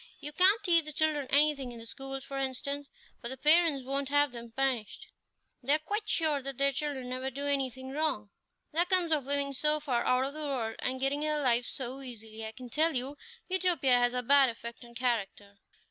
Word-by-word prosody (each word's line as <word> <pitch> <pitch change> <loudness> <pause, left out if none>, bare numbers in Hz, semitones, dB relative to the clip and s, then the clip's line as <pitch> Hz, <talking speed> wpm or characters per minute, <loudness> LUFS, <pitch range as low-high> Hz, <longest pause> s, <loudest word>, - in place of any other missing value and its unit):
You 295 - -4
can't 390 +7 +4
teach 335 -4 +3
the 305 - -5
children 300 -2 0
anything 285 -3 +3
in 240 - -9
the 230 - -10
schools, 270 +2 -5
for 275 0 -5
instance, 280 +2 -3 0.3
for 235 - -5
the 265 - -6
parents 305 -2 +4
won't 275 +1 -2
have 290 -1 +3
them 235 -1 -9
punished; 255 -4 -2 0.6
they 275 +4 +3
are - - +2
quite 415 +7 -4
sure 310 -4 +2
that 270 -1 -5
their 275 0 +3
children 275 -2 -3
never 255 +1 -3
do 280 +2 -6
anything 265 -2 -2
wrong. 275 -9 -2 0.4
That 345 +3 +2
comes 360 -3 +3
of 295 -4 +1
living 280 0 0
so 300 +3 +2
far 265 -5 -1
out 255 +1 +2
of 275 - -4
the 305 - -8
world, 260 -7 -3
and 260 +1 -2
getting 270 +2 0
their 305 0 0
living 240 -2 +3
so 260 +2 -3
easily. 225 -3 -8
I 220 - -5
can 250 +2 -10
tell 315 +2 +2
you, 260 +3 -1 0.3
Utopia 350 -9 +3
has 245 0 +2
a 250 - -1
bad 275 +1 +5
effect 235 +1 -8
on 235 0 -15
character." 210 -5 -2
270 Hz, 210 wpm, -30 LUFS, 250-300 Hz, 0.6 s, bad